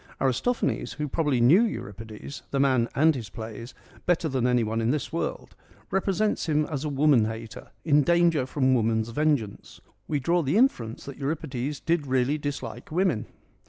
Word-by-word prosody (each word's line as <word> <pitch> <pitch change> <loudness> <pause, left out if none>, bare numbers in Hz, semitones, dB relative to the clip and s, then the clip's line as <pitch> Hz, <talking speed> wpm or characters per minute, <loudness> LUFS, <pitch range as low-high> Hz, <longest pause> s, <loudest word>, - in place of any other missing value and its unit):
Aristophanes, 135 - 0
who 150 -1 -3
probably 145 -3 0
knew 140 - +6
Euripides 110 - -5
— - - -37
the 140 - -1
man 130 -4 +3
and 160 +3 +5
his 120 -7 -6
plays 115 +1 -8
— - - -23
better 175 -2 +2
than 130 -4 0
anyone 115 -2 +1
in 115 - +1
this 150 +3 -2
world, 165 - -4 0.4
represents 195 +1 0
him 150 0 +2
as 145 -3 -4
a 150 - -2
woman 140 -5 +4
hater 110 0 -7 0.2
in 150 -2 +5
danger 170 -3 +3
from 130 -1 +2
woman's 110 -2 +1
vengeance. 140 -6 -1 0.3
We 150 - 0
draw 170 +6 +2
the 150 +5 +1
inference 120 - +1
that 140 -2 -8
Euripides 145 -1 -3
did 165 -4 0
really 130 +3 +1
dislike 135 -5 -5
women. 170 - +1
140 Hz, 170 wpm, -26 LUFS, 120-155 Hz, 0.4 s, knew